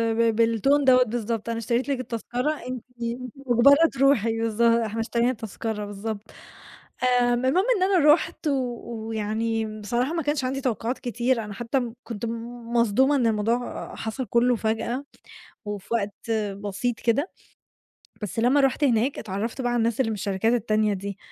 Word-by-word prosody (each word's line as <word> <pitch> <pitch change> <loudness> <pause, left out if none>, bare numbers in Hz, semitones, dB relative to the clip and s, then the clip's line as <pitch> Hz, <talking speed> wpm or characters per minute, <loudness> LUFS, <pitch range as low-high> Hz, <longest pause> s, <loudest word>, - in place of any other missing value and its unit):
ب 230 -1 +2
بالtune 230 +6 +3
دوّة 255 -1 +6
بالضبط، 230 -1 -3
"أنا 230 - -2
اشتريت 235 +4 -1
لِك 275 -2 0
التذكرة، 245 +3 -2 0.2
أنتِ 255 -2 -5 0.5
مُجبرة 275 +4 +5
تروحي." 255 -5 +3
بالض 225 0 -1
"إحنا 230 -1 +3
اشترينا 235 +1 +1
التذكرة،" 220 -1 -5
بالضبط. 205 +1 -5 1.0
آمم، 245 +1 +1
المهم 360 - +3
إن 370 - +1
أنا 350 -6 +6
رُحت 325 0 -2
و 285 - +2 0.5
ويعني 220 0 -2
بصراحة 245 +8 -1
ما 335 -1 -1
كانش 290 -1 0
عندي 270 +2 -2
توقعات 245 0 -2
كتير، 240 -1 0
أنا 210 - -7
حتّى 240 +2 -2
كنت 230 -1 -5 0.5
مصدومة 240 +5 +3
إن 245 -4 +2
الموضوع 225 +3 -1
حصل 225 +4 -4
كله 240 +3 +3
فجأة، 230 +5 -2 0.6
وفي 205 -2 -6
وقت 210 0 -3 0.3
بسيط 210 +4 -2
كده، 275 - +1 0.9
بس 210 +2 -4
لما 250 +5 +4
رُحت 270 +2 +1
هناك 250 +1 +2
اتعرّفت 220 +5 -4
بقى 245 -1 0
على 240 - +1
الناس 230 +1 0
اللي 225 -4 +2
من 215 - -2
الشركات 205 +2 0
التانية 215 -2 +1
دي، 200 0 -5
235 Hz, 155 wpm, -25 LUFS, 220-260 Hz, 1.0 s, دوّة